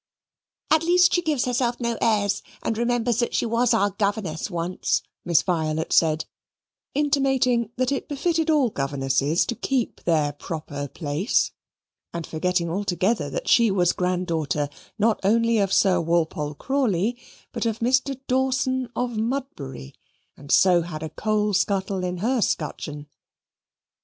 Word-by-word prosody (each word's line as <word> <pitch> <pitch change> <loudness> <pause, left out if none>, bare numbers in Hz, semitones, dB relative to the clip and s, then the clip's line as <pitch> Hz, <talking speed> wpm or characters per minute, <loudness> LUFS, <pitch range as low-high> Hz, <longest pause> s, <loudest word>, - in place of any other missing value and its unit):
"At 315 0 +5
least 360 +2 +4
she 350 - +3
gives 305 -7 0
herself 245 -1 0
no 235 -1 -1
airs 205 -3 +2 0.2
and 225 - -1
remembers 235 0 0
that 240 - 0
she - - +1
was 235 +1 +2
our 205 -3 +3
Governess 200 -4 -2
once," 175 0 -1 0.2
Miss 170 -2 +3
Violet 160 -3 -1
said, 160 -1 +3 0.7
intimating 270 -5 +2
that 255 +1 0
it 275 - -2
befitted 325 +3 0
all 285 -7 +3
governesses 135 +2 0
to - - -2
keep 250 +1 -2
their 155 -4 +2
proper 145 -1 -6
place, 150 - 0 0.6
and 170 -1 -3
forgetting 175 +1 -1
altogether 190 +4 0
that - - -5
she 235 -2 +5
was 180 -3 +2
granddaughter 165 -6 -1 0.3
not 220 +1 +2
only 230 +3 +3
of 195 -2 +1
Sir 185 -3 +3
Walpole 160 -3 -1
Crawley, 240 - 0 0.4
but 230 -1 -2
of 225 -1 -1
Mr. 260 +3 +1
Dawson 260 -1 0
of 245 -2 -2
Mudbury, 220 - -4 0.4
and 140 0 -9
so 180 -3 +5
had 160 -2 -6
a 160 - -5
coal 210 -1 0
scuttle 190 -1 0
in 180 0 -2
her 235 +6 0
scutcheon. 150 -4 -2
205 Hz, 140 wpm, -24 LUFS, 165-245 Hz, 0.7 s, At